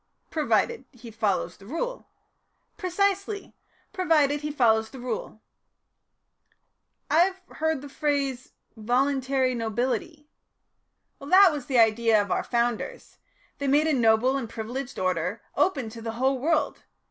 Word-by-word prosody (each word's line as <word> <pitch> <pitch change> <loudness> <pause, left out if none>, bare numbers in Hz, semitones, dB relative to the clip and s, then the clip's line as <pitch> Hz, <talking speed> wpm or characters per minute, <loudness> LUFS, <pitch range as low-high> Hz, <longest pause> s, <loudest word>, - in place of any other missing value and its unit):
"Provided 260 -4 0
he 240 -3 -12
follows 205 -5 -1
the 195 - -15
Rule." - - -4 0.7
"Precisely 395 +1 -1 0.4
provided 300 -6 +2
he 300 - -3
follows 220 -6 +2
the 265 - -11
Rule." 235 -3 -5 1.7
"I 310 - +4
have 380 +2 +2 0.2
heard 320 -3 0
the - - -7
phrase, 275 -3 -2 0.2
'voluntary 260 +3 +1
nobility.'" 255 +7 -2 0.9
"That 370 +6 +6
was 290 -4 -5
the 260 - +1
idea 225 -1 +4
of 200 -2 -2
our - - +1
Founders. 240 - -2 0.4
They 280 - -2
made 290 +3 +4
a 315 - +2
noble 240 +1 +3
and 230 -5 -5
privileged 245 +4 -6
order 185 +3 -1
open 285 -5 +1
to 230 +1 -10
the 225 0 -4
whole 260 +3 +1
world. 305 +1 0
265 Hz, 130 wpm, -26 LUFS, 230-300 Hz, 1.7 s, That